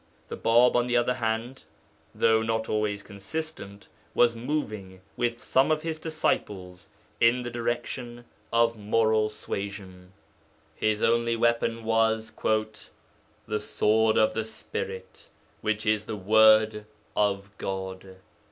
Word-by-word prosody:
The - - -4
Bāb, 120 +2 +4
on 120 0 +2
the 120 0 +2
other 120 +1 +2
hand, 115 +2 -3 0.5
though 110 -1 +3
not 110 0 -1
always 105 -1 -1
consistent, 100 0 -7 0.3
was 120 -1 +4
moving, 110 -8 -4
with 120 -1 -1
some 135 +3 +2
of 155 -1 +1
his 160 -1 -3
disciples, 95 - -3 0.3
in 120 +2 +4
the 120 - -5
direction 120 0 -4 0.3
of 115 0 +3
moral 110 0 +2
suasion; 95 -3 -7 0.6
his 110 0 0
only 115 0 +2
weapon 115 0 +1
was 110 0 +1
'the 110 0 -4
sword 110 +1 +2
of 110 - +3
the 110 - -1
Spirit, 95 -3 -7 0.3
which 110 0 -1
is 105 0 +1
the 110 - -4
word 110 +1 +4 0.3
of 100 -1 0
God.' 95 0 -5
110 Hz, 125 wpm, -27 LUFS, 105-120 Hz, 0.6 s, Bāb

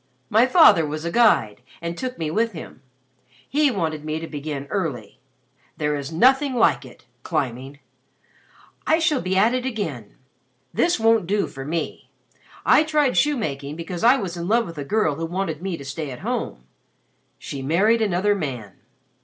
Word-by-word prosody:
My 225 +4 +5
father 290 - +6
was 155 +1 -4
a 170 - -2
guide 170 - +3 0.2
and 170 0 -4
took 255 +5 -5
me 155 -2 -3
with 225 +4 0
him. 155 -5 -10 0.7
He 295 +1 +2
wanted 160 - -2
me 155 +1 -3
to 165 - -6
begin 145 -2 -5
early. 145 - -3 0.6
There 150 -1 0
is 140 0 -5
nothing 265 - +3
like 235 - +3
it - - -15 0.2
climbing. 130 +2 -3 1.1
I 315 - +4
shall 315 -5 +1
be 185 +1 -1
at 220 +5 +4
it 255 -1 -1
again. 180 - -5 0.6
This 340 -6 +2
won't 225 -4 +3
do 205 +2 +1
for 135 -1 -8
me. 165 +2 -4 0.6
I - - +6
tried 300 -4 +1
shoemaking 150 - 0
because 170 +3 -6
I 245 +4 +6
was 190 -8 -4
in 170 0 -5
love 230 +3 +2
with 165 -4 -8
a - - -3
girl 185 0 +1
who 165 - -3
wanted 170 -3 -3
me 185 -2 -3
to 140 - -10
stay 145 +2 -5
at 125 -2 -8
home. 60 - -3 0.7
She 140 - -7
married 195 +11 +2
another 205 0 +2
man. 125 - -5
170 Hz, 170 wpm, -23 LUFS, 150-230 Hz, 1.1 s, father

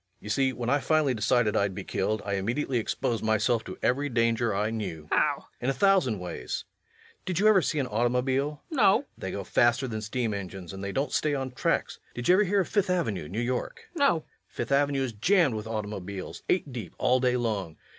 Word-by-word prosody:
You 105 - -9
see, 130 +4 +2
when 120 -2 -5
I 140 +4 +3
finally 155 -2 +2
decided 115 -1 +2
I'd 100 -2 +1
be - - -5
killed, 110 0 -1
I 100 - -2
immediately 120 +6 0
exposed 115 +1 -2
myself 110 +2 +2
to - - -7
every 140 +3 +1
danger 115 -1 +1
I 105 +2 0
knew. 95 -9 -4
LUKE. 75 - -21
How? - - +4
REVENUE. - - -16 0.2
In 125 - 0
a - - +2
thousand 180 - +3
ways.... 90 -1 -5 0.6
Did 180 -3 -3
you 205 +3 +4
ever 210 -3 +6
see 155 - -1
an 140 - +1
automobile? 125 +5 0
LUKE. 305 - -3
No. 205 -4 +7
REVENUE. 275 - -2
They 95 - -4
go 100 - -4
faster 120 +6 +2
than 110 -3 -4
steam 110 +1 -2
engines, 95 -3 -6
and 95 0 -7
they 100 - -3
don't 135 +5 -1
stay 150 -1 +1
on 135 -1 -3
tracks. 125 - -1 0.2
Did 120 - -3
you 180 - +7
ever 210 +3 +4
hear 200 +1 +2
of 180 - -3
Fifth 205 -3 +1
Avenue, 130 - -1
New 100 +5 -3
York? 130 - -3
LUKE. 340 - -6
No. 285 - +6
REVENUE. 160 - -5 0.2
Fifth - - -5
Avenue 140 -1 +2
is 125 -3 -3
jammed 160 - +3
with 110 0 -4
automobiles, 100 -3 -5
eight 150 -7 +1
deep 110 -8 -7
all 130 +1 +3
day 125 -1 +2
long. 105 -9 -2
120 Hz, 230 wpm, -28 LUFS, 105-145 Hz, 0.6 s, No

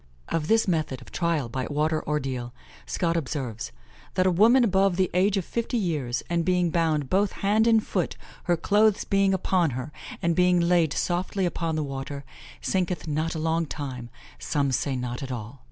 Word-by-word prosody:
Of 160 -2 -1
this 225 +1 +3
method 155 -7 0
of - - -16
trial 165 -6 0
by 130 +2 -3
water 155 +2 0
ordeal, 130 -5 -2 0.3
Scot 170 -2 0
observes: 130 - -3 0.4
"that 185 - +3
a 185 - +4
woman 230 +8 +5
above 195 -3 +3
the 185 0 +1
age 195 +3 +3
of 190 - -1
fifty 235 +1 -2
years, 150 - -1
and 170 -1 0
being 180 -1 +2
bound 155 -4 +1
both 195 +6 +2
hand 215 +3 +3
and 225 -2 +4
foot, 180 -4 -2 0.3
her 175 -1 +2
clothes 205 +4 +3
being 195 0 +2
upon 185 -2 +2
her, 130 +4 -5 0.3
and 170 -1 +1
being 180 0 +4
laid 170 -3 +3
softly 185 +2 -1
upon 165 -2 -1
the 155 - 0
water, 140 0 -5 0.4
sinketh 180 -2 -1
not 155 +2 -1
a - - -2
long 160 +1 0
time, 130 -5 -6 0.3
some 140 -3 0
say 130 +2 0
not 125 -1 -4
at 135 -1 -5
all." 120 +2 -6
165 Hz, 185 wpm, -26 LUFS, 140-185 Hz, 0.4 s, woman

